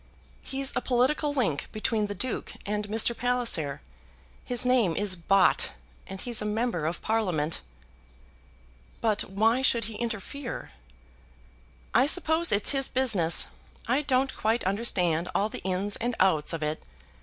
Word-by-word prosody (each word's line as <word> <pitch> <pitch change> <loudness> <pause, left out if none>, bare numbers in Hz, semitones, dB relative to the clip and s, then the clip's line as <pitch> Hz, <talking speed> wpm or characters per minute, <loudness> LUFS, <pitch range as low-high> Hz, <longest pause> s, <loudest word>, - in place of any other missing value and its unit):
"He's 270 0 -2
a - - +1
political 265 +4 +1
link 215 - -1
between 215 0 -1
the 205 - -5
Duke 255 +5 -3
and 210 0 -2
Mr. 225 +2 +3
Palliser. 235 - +1 0.6
His 245 0 +1
name 240 -10 +3
is 205 -2 +2
Bott, 185 +2 +3 0.3
and 190 0 -7
he's 235 +1 -1
a - - -2
Member 210 -6 -1
of 165 - -4
Parliament." 180 -9 0 1.4
"But 215 -2 0
why 220 +6 +2
should 235 -4 +2
he 220 0 -6
interfere?" 235 +3 -5 1.2
"I 250 +4 +4
suppose 320 +1 +2
it's 205 0 +2
his 270 -2 +2
business. 205 -11 +2 0.4
I 255 +5 +2
don't 265 -2 +1
quite 225 +2 0
understand 185 -4 0
all 205 +4 +1
the - - -7
ins 190 +2 -1
and 240 +1 -2
outs 170 -6 +3
of 165 -2 -3
it. 150 +1 -2
220 Hz, 145 wpm, -27 LUFS, 190-250 Hz, 1.4 s, I